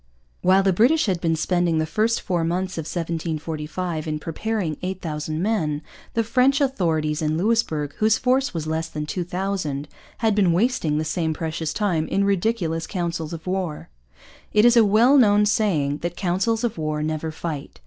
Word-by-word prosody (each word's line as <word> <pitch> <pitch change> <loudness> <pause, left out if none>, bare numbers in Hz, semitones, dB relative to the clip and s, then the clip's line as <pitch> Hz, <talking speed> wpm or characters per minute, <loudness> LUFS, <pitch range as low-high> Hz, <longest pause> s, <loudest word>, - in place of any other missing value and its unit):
While 190 +2 +4
the 190 -1 +3
British 255 - +4
had 185 -5 -1
been 165 -2 +1
spending 175 +1 +1
the 155 - +1
first 215 +8 0
four 175 -4 -1
months 180 +1 -2
of 160 - -4
1745 160 0 -3
in 155 -1 -1
preparing 165 +1 -3
8,000 160 -4 -4
men, 160 -7 0 0.3
the 230 - +2
French 255 +5 +3
authorities 165 - 0
in 155 0 0
Louisbourg, 165 -8 0
whose 220 +1 +4
force 260 +2 +1
was 160 -3 -4
less 160 +1 -2
than 150 -1 -4
2,000, 180 -4 -3 0.3
had 220 -1 +2
been 195 -4 +3
wasting 180 -6 +1
the 155 - -1
same 160 -1 -1
precious 160 0 -3
time 170 -4 0
in 200 - +1
ridiculous 190 -4 0
councils 170 -4 -3
of 165 -2 -7
war. 180 - -3 0.6
It 210 +1 +5
is 240 0 +6
a 230 - +7
well 225 +7 +5
known 210 -3 +5
saying 165 -10 +1
that 175 0 -4
councils 195 +5 0
of 225 -8 -2
war 155 -1 -2
never 155 +1 -2
fight. 155 -3 -6
175 Hz, 170 wpm, -23 LUFS, 155-210 Hz, 0.6 s, a